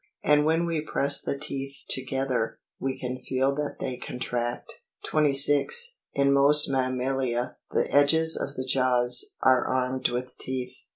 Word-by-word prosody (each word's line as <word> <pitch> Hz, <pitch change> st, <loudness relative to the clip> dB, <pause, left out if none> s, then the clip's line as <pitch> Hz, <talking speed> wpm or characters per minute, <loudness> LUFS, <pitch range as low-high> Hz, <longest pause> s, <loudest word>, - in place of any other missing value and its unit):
and 150 Hz, 0 st, +3 dB
when 165 Hz, +2 st, +1 dB
we 165 Hz, -2 st, -2 dB
press 140 Hz, -2 st, -1 dB
the 140 Hz, -, -3 dB
teeth 140 Hz, -1 st, -5 dB
together, 130 Hz, -3 st, -2 dB, 0.2 s
we 135 Hz, 0 st, -3 dB
can 125 Hz, 0 st, -5 dB
feel 130 Hz, +2 st, -1 dB
that 145 Hz, 0 st, -4 dB
they 125 Hz, -, -4 dB
contract. 120 Hz, -1 st, -5 dB, 0.3 s
26. 150 Hz, -, +3 dB, 0.2 s
In 140 Hz, 0 st, +3 dB
most 145 Hz, +2 st, +7 dB
mammalia 130 Hz, -1 st, -2 dB
the -, -, 0 dB
edges 160 Hz, +3 st, +3 dB
of 140 Hz, -, -5 dB
the 130 Hz, -, -4 dB
jaws 125 Hz, -2 st, +2 dB
are 130 Hz, -2 st, +4 dB
armed 130 Hz, 0 st, -1 dB
with 125 Hz, +1 st, -5 dB
teeth. 130 Hz, -1 st, -5 dB
135 Hz, 140 wpm, -26 LUFS, 125-145 Hz, 0.3 s, most